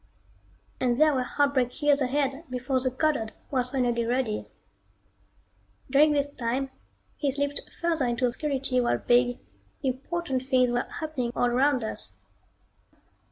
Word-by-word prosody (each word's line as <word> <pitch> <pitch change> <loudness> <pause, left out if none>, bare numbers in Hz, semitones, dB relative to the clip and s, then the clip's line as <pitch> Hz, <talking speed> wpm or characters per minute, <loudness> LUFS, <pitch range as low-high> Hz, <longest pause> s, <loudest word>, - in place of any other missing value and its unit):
And 245 -1 +1
there 310 -1 +5
were 260 - +1
heartbreak 260 -1 0
years 290 -1 +3
ahead 275 +3 0
before 255 +1 -1
the 255 0 +1
Goddard 260 -4 0 0.2
was 255 -2 +2
finally 245 -3 0
ready. 235 -2 -1 1.4
During 295 +2 +5
this 285 0 0
time 260 +3 -2 0.5
he 285 - 0
slipped 285 +1 -1 0.2
further 325 -6 +1
into 240 +2 0
obscurity 265 0 0
while 240 - +1
big, 245 0 +3 0.5
important 270 +2 -2
things 255 -2 +2
were 245 0 0
happening 295 -7 -3
all - - +2
around 260 0 +2
us. 220 - -5
260 Hz, 130 wpm, -27 LUFS, 245-285 Hz, 1.4 s, there